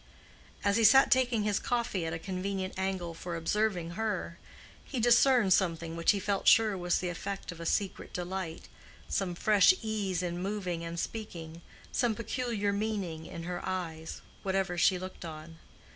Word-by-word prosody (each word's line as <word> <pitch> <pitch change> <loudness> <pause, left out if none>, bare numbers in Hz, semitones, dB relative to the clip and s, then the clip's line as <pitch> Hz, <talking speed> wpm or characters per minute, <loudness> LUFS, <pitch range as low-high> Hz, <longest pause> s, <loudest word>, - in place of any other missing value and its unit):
As 200 +1 +3
he 230 - +3
sat 265 +5 +7
taking 250 -4 +3
his 210 -1 +1
coffee 230 -8 -1
at - - -2
a - - -2
convenient 190 +2 -3
angle 190 -3 -2
for 170 +1 -6
observing 175 0 0
her, 190 -4 -3 0.4
he 260 - -4
discerned 240 -3 +5
something 165 -3 0
which 165 0 0
he 205 - +5
felt 195 0 -1
sure 220 -3 +6
was 175 -1 +1
the 180 - -2
effect 195 +2 -5
of 170 - -10
a 165 - -4
secret 200 -3 -1
delight—some 180 +1 -5
fresh 210 - +5
ease 200 -5 -1
in 175 0 -3
moving 185 -4 -3
and 170 0 -4
speaking, 170 -7 -6 0.3
some 235 -3 +1
peculiar 230 -3 -1
meaning 200 -6 -3
in 165 - -7
her 175 +1 -4
eyes, 165 -4 -4 0.2
whatever 190 -2 0
she 180 +2 +4
looked 185 +1 -8
on. 160 0 -9
190 Hz, 160 wpm, -30 LUFS, 170-210 Hz, 0.4 s, sat